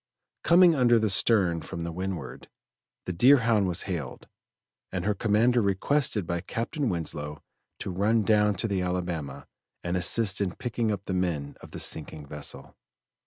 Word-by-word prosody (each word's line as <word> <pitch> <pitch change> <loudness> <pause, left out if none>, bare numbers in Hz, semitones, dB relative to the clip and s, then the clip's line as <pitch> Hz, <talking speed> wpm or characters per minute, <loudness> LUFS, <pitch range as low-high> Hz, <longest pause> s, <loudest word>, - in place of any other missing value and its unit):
Coming 175 +1 +6
under 125 -5 +4
the 110 -2 +1
stern 90 -3 +3
from 85 +3 -7
the 85 0 -4
windward, 90 -6 -6 0.6
the 90 - -3
Deerhound 115 -1 +4
was 90 -2 -1
hailed, 80 -10 -5 0.6
and 90 -1 -3
her 105 - +2
commander 115 +4 +2
requested 105 +2 0
by 85 0 -2
Captain 125 - -3
Winslow 75 -4 -4 0.3
to - - -5
run 105 +5 +1
down 105 -1 +3
to 95 - -2
the 100 -3 -1
Alabama 90 -6 -3 0.4
and 85 +1 -2
assist 95 +3 +2
in 95 -3 -1
picking 120 -2 -2
up 100 -1 -4
the 95 - -3
men 85 -6 -2
of - - -12
the - - -8
sinking 75 -1 -1
vessel. 70 -2 -6
95 Hz, 160 wpm, -27 LUFS, 85-115 Hz, 0.6 s, Coming